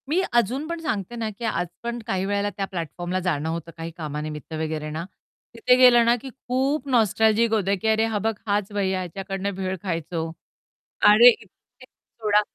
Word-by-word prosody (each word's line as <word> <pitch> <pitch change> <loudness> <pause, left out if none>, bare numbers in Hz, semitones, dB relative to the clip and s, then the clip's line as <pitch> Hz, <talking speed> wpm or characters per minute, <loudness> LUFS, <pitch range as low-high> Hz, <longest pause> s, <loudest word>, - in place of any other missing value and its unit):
मी 330 +5 +2
अजून 240 +6 +1
पण 335 0 -4
सांगते 225 - -3
ना, 225 -2 -2
की 215 +3 -7
आज 175 -5 -1 0.2
पण 235 0 -3
काही 190 0 -1
वेळेला 200 +1 0
त्या 195 - -1
प्लॅटफॉर्मला 175 0 -4
जाणं 160 -4 -1
होतं 165 0 -4
काही 165 0 -6
कामानिमित्त 150 0 -5
वगैरे 155 -1 -3
ना, 155 +2 -4 0.5
तिथे 250 - +4
गेलं 245 -2 +7
ना, 235 +1 +4
की 270 - -7
खूप 265 +3 -2
नॉस्टॅल्जिक 220 -1 +3
होतं, 200 -2 +2
की - - -1
"अरे 220 0 +3
हा 225 -2 -1
बघ 225 +2 0
हाच 205 0 0
भैय्या 190 -2 0
ह्याच्याकडनं 195 +2 -4
भेळ 190 0 -2
खायचो," 165 -2 -3 0.8
अरे 225 +4 +9
इथे 225 -2 -6 0.4
सोडा 210 -4 -1
200 Hz, 175 wpm, -24 LUFS, 175-235 Hz, 0.8 s, अरे